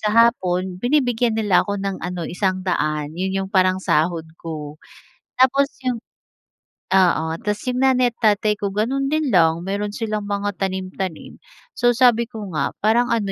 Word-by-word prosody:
sa 210 - 0
hapon, 190 -5 +2
binibigyan 245 -4 +1
nila 205 -4 +3
ako 205 0 -2
ng 195 -1 -4
ano, 175 -1 -4
100 180 -6 -1
'yon 185 +3 -2 0.2
'yong 190 - -10
parang 185 -1 +3
sahod 165 -2 0 0.2
ko. 155 -2 -7 0.5
Tapos 265 +2 +4 0.2
'yong 250 -2 -1 0.9
oo, 180 -4 +3
tas 210 0 -3
'yong 250 0 -2
nanay 255 -2 +3
at - - -40 0.2
tatay 210 0 -1
ko 200 - -1
gano'n 265 +6 0
din 300 -2 0
lang, 165 -2 +3
meron 205 +2 -3
silang 215 -2 -3
mga 205 -1 -3
tanim-tanim. 190 -2 -4 0.3
So, 240 - +2
sabi 235 -2 +4
ko 215 -6 -8
nga, 140 -3 -2
parang 235 +3 +3
ano 200 -3 -2
205 Hz, 160 wpm, -21 LUFS, 185-235 Hz, 0.9 s, Tapos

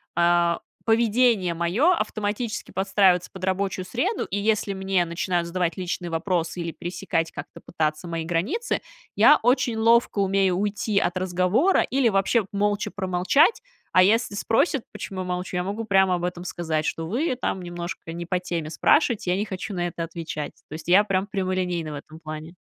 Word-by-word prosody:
а, 170 0 +3 0.3
поведение 225 -5 +3
моё 195 - +2
автоматически 215 -4 -3
подстраивается 190 -2 +2
под 190 -1 -10
рабочую 190 0 -1
среду, 345 - -1
и 200 - -3
если 210 -1 0
мне 190 -2 +1
начинают 170 +1 -1
задавать 175 0 -1
личные 180 -1 -4
вопросы 170 +1 -1
или 170 - -3
пересекать 175 -1 -3
как-то - - -9
пытаться 155 +2 -2
мои 165 -1 -3
границы, 195 - -1 0.3
я - - +7
очень 245 -1 +2
ловко 230 -1 +3
умею 195 -2 +2
уйти 205 0 0
от 175 0 -1
разговора 185 - +2
или 260 -3 +2
вообще 195 +2 +2
молча 205 0 0
промолчать. 195 - +2 0.3
А 185 - +7
если 210 +1 +2
спросят, 225 +5 +1
почему 190 -1 -5
я - - -4
молчу, 180 0 -4
я 180 - 0
могу 205 +4 -4
прямо 190 -3 +3
об 175 - -4
этом 180 0 -3
сказать, 160 -3 -2
что 165 0 -2
вы 255 - 0
там 190 -6 -3
немножко 175 -1 -6
не 170 0 -6
по 180 0 0
теме 170 -3 -4
спрашиваете, 215 - +2
я 185 - +1
не 210 - -1
хочу 195 +1 -5
на 175 -1 -1
это 170 0 -5
отвечать. 165 -3 -5 0.2
То - - -9
есть 155 +1 -8
я 190 +4 +6
прямо 195 -2 0
прямолинейна 185 -5 -2
в - - -5
этом 155 +2 -10
плане. 155 +1 -8
185 Hz, 175 wpm, -24 LUFS, 175-210 Hz, 0.3 s, я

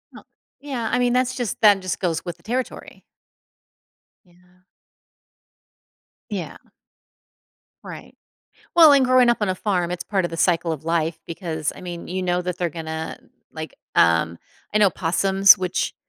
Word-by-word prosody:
Oh. - - -12 0.4
Yeah, 260 -5 -4
I 250 - +1
mean, 245 -1 +2
that's 255 0 +1
just 245 -5 -4
that 205 -3 +6
just 185 -2 -4
goes 165 -3 -2
with 175 -2 -6
the 170 - -27
territory. 250 +3 -5 1.2
Yeah. 180 +1 -27 1.7
Yeah. - - -5 1.3
Right. - - -11 0.6
Well, 325 -3 +8
and 275 -2 +5
growing 255 -1 +4
up 240 - +3
on 205 - 0
a 185 - -1
farm, 180 -3 -1
it's 175 -1 -4
part 195 -3 -1
of 175 - -5
the 165 - -6
cycle 170 0 +1
of 155 -2 -6
life 165 0 -1
because, 160 -3 -4
I - - -12
mean, 175 -2 -7
you 185 +1 -3
know 180 0 0
that 180 -1 -4
they're 175 -2 -1
gonna, 160 0 -6 0.3
like, - - -8 0.2
um 85 0 +3 0.4
I - - +3
know 205 -2 +5
possums 195 +4 +4
which 185 -1 -2
180 Hz, 160 wpm, -22 LUFS, 170-210 Hz, 1.7 s, Well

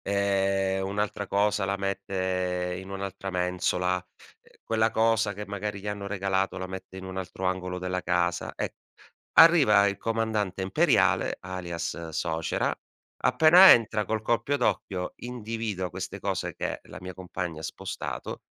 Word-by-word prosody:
ehm, 95 -1 +1
un'altra 100 0 -2
cosa 100 0 +1
la 100 0 0
mette 95 -2 -2
in 95 - -10
un'altra 95 0 -5
mensola. 90 0 0 0.4
Ehm, - - -24
quella 110 0 +2
cosa 110 -2 +2
che 105 - -6
magari 100 0 -4
gli 100 - -9
hanno 100 -1 -4
regalato 95 -1 -1
la 95 - -4
mette 95 0 -8
in 95 - -7
un 95 0 -6
altro 95 +1 -6
angolo 90 0 -1
della 90 0 -2
casa, 85 -1 0
e - - -4 0.6
arriva 140 -12 +7
il 100 0 -4
comandante 110 -4 -1
imperiale, 95 - +2
alias 85 -2 -5
suocera, 80 0 -1 0.4
appena 175 +4 +8
entra 110 -3 +2
col 110 -1 -1
colpo 120 +5 +1
d'occhio 95 -7 -1
individua 110 -6 -4
queste - - -6
cose - - -2
che - - -4
la - - -12
mia 90 0 -6
compagna 90 -3 -5
ha - - -8
spostato, - - -5
95 Hz, 145 wpm, -27 LUFS, 90-105 Hz, 0.6 s, appena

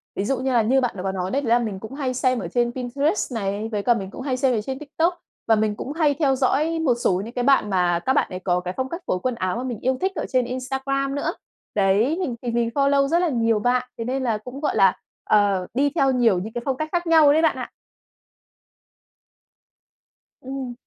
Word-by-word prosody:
Ví 195 - -2
dụ 270 +4 0
như 260 0 -1
là 235 - +4
như 260 +5 +2
bạn 245 -4 -1
đã 180 - -5
có 195 - -1
nói 185 0 -3
đấy, 280 - 0
đấy 255 - -3
là 235 +1 +5
mình 215 -5 -3
cũng 220 +6 -9
hay 270 -2 -2
xem 255 0 +1
ở - - -4
trên 240 -1 0
Pinterest 265 - -1
này, 205 0 -2
với 205 -2 -2
cả 240 - +4
mình 195 -5 -4
cũng - - -8
hay 260 -1 -2
xem 255 0 +2
ở 215 - 0
trên 265 +4 -5
TikTok, 325 +4 -1 0.3
và 225 - +5
mình 215 -1 0
cũng 265 - -6
hay 305 -2 +2
theo 280 -3 +1
dõi 300 +5 +1
một 300 -6 +3
số 190 -6 0
những 230 - -9
cái 245 - -1
bạn 265 -5 +3
mà 180 -3 +2
các 265 - +3
bạn 285 - +2
ấy 185 - -6
có 180 -1 0
cái 180 0 -5
phong 260 0 -2
cách 335 +5 -5
phối 185 - 0
quần 255 +4 -2
áo 185 -1 -2
mà 245 - -3
mình 245 -5 -4
yêu 260 +1 0
thích 380 +1 +1
ở - - -2
trên 255 -2 +2
Instagram 270 +2 -2
nữa. 315 +4 -1 0.4
Đấy, 210 - +2
mình 265 -10 -2
thì 245 - -3
mình 235 0 0
follow 280 0 +3
rất 335 +4 +2
là 355 -1 +1
nhiều 230 -4 +1
bạn, 250 +3 +1
thế 230 - -3
nên 260 +2 -2
là 230 -4 0
cũng, 250 +5 -9
gọi 300 - 0
là, 195 -3 +5 0.3
ờ, 200 -3 +2
đi 280 +4 +2
theo 270 -5 +3
nhiều 235 -7 +3
những 215 +5 -6
cái 240 - -3
phong 265 -2 -1
cách 310 +2 -3
khác 350 0 -1
nhau 320 -3 +6
đấy 315 - +3
bạn 320 - +3
ạ. - - -5 2.7
Ừm. 260 -1 -5
250 Hz, 255 wpm, -23 LUFS, 215-275 Hz, 2.7 s, nhau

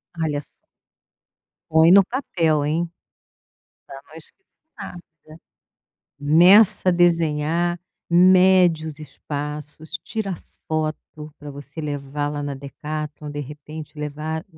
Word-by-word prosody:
Olha 155 -3 -2
só - - -19 1.1
põe 160 +1 +5
no 195 +1 +8
papel 165 - 0
hein, 165 +3 -1 1.0
pra 135 - -10
não 155 - -17
esquecer 165 - -16 0.3
rápido. 165 -4 -12 0.8
Meça 185 +7 +5
a - - +2
desenhar, 170 0 +1 0.3
mede 180 -2 +5
os 155 -1 -7
espaços, 150 +1 -6
tira 200 -3 -4 0.3
foto 155 -1 -4
pra 145 0 -9
você 145 +2 -9
levar 145 -1 -3
lá 145 0 -4
na 140 -1 -4
Decathlon, 150 +2 -7
de 145 0 -5
repente 150 +2 -10
levar 150 +2 -4
155 Hz, 110 wpm, -22 LUFS, 150-175 Hz, 1.1 s, no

